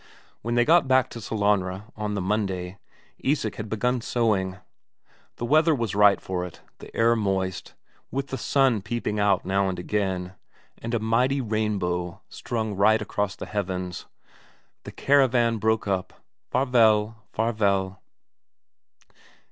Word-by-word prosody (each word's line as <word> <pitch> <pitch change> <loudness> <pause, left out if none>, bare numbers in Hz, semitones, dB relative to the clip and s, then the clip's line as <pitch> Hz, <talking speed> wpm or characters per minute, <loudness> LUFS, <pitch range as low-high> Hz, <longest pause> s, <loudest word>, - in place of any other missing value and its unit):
When 120 +2 -2
they 120 0 +4
got 170 -1 +5
back 130 0 +3
to 115 - -7
Sellanraa 105 -1 -1
on 105 -1 -3
the 100 - -1
Monday, 95 -2 -2 0.4
Isak 130 -7 -1
had 110 -1 -5
begun 125 +4 0
sowing. 100 -6 0 0.8
The 120 - -4
weather 155 +4 +4
was 115 -6 -2
right 105 0 +5
for 90 -1 -3
it; 90 -3 -8 0.2
the - - -11
air 115 +1 +4
moist, 95 -4 -2 0.3
with 135 +1 -3
the 135 - -3
sun 130 -4 +2
peeping 105 0 -3
out 100 -2 +2
now 95 +1 +1
and 90 - -4
again, 95 -1 -2 0.5
and 115 +1 -3
a - - +1
mighty 125 +5 +1
rainbow 100 -6 -2
strung 110 -3 -3
right 110 +3 +4
across 105 -2 -2
the - - -7
heavens. 90 -3 -4 0.8
The - - -7
caravan 125 -5 +3
broke 110 0 +1
up 95 -2 -1 0.4
Farvel, 115 -4 +3
Farvel.... 100 -4 0
105 Hz, 140 wpm, -25 LUFS, 95-120 Hz, 0.8 s, got